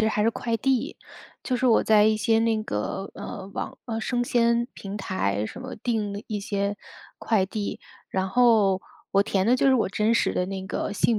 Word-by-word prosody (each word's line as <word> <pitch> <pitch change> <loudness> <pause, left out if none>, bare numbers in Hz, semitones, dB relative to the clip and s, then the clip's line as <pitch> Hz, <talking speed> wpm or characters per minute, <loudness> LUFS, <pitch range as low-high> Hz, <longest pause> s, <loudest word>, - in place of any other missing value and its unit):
实 220 - +3
还 210 -1 0
是 225 - +3
快 230 0 -2
递， 260 +2 0 0.5
就 255 - -1
是 255 +1 +1
我 230 - +5
在 215 -1 +5
一 215 0 +4
些 225 +1 +2
那 225 -1 +1
个， 190 - -3
呃， 190 -1 -7
网 - - -5
呃， 225 -2 -3
生 245 +2 0
鲜 235 0 +2
平 200 +1 -7
台 105 - -1
什 110 - -7
么 255 - -7
定 210 -4 -2
一 210 -2 -2
些 200 0 -2 0.4
快 215 -4 +2
递， 205 +1 -4 0.3
然 190 0 -1
后 210 -3 +4 0.3
我 200 - +4
填 195 -1 0
的 240 - +5
就 255 - +2
是 265 - +6
我 240 - +2
真 215 +3 +2
实 - - +2
的 180 - 0
那 190 0 -5
个 - - -3
姓 225 +1 +2
215 Hz, 220 characters per minute, -25 LUFS, 195-235 Hz, 0.5 s, 是